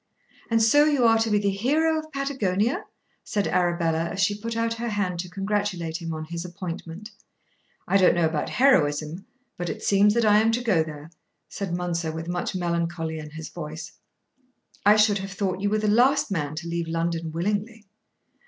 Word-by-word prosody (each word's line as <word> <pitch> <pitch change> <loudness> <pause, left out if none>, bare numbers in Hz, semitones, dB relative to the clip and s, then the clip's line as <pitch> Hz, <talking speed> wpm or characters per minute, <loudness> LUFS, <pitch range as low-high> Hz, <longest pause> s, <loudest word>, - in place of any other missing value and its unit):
"And 225 -1 +3
so 290 +7 +5
you 285 -5 +3
are 225 -1 +5
to 225 0 +1
be 210 - +3
the 200 -1 +1
hero 305 +10 +1
of 310 0 -10
Patagonia?" 250 -6 -1 0.4
said 205 -1 -1
Arabella 170 -2 +1
as 190 +3 -5
she 205 - +3
put 225 +3 -5
out 230 0 0
her 235 +1 -4
hand 195 -5 -2
to 180 +1 -4
congratulate 195 -4 -2
him 165 -1 -4
on 155 -1 -4
his 170 +1 -5
appointment. 180 +2 -7 0.8
"I 195 - +4
don't 185 -3 +5
know 170 -1 +2
about 155 -1 -1
heroism, 160 - +2 0.3
but 175 -1 -3
it - - -6
seems 205 +1 +4
that 235 -1 +2
I 210 0 +6
am 225 +1 +3
to 240 +1 -1
go 200 -9 +3
there," 155 0 -9 0.4
said 195 -3 -5
Mounser 170 -2 -2
with 160 +1 -6
much 175 +1 -3
melancholy 170 -2 -2
in 150 0 -8
his 160 +1 -8
voice. 155 -1 -7 0.9
"I 205 +1 +6
should 210 -1 +4
have 195 0 -6
thought 190 -2 -2
you 205 - +1
were 215 - +1
the 215 0 -1
last 245 +4 +3
man 150 -5 -2
to 170 +2 -6
leave 170 0 -2
London 165 0 -2
willingly." 210 +6 -2
190 Hz, 190 wpm, -25 LUFS, 165-215 Hz, 0.9 s, I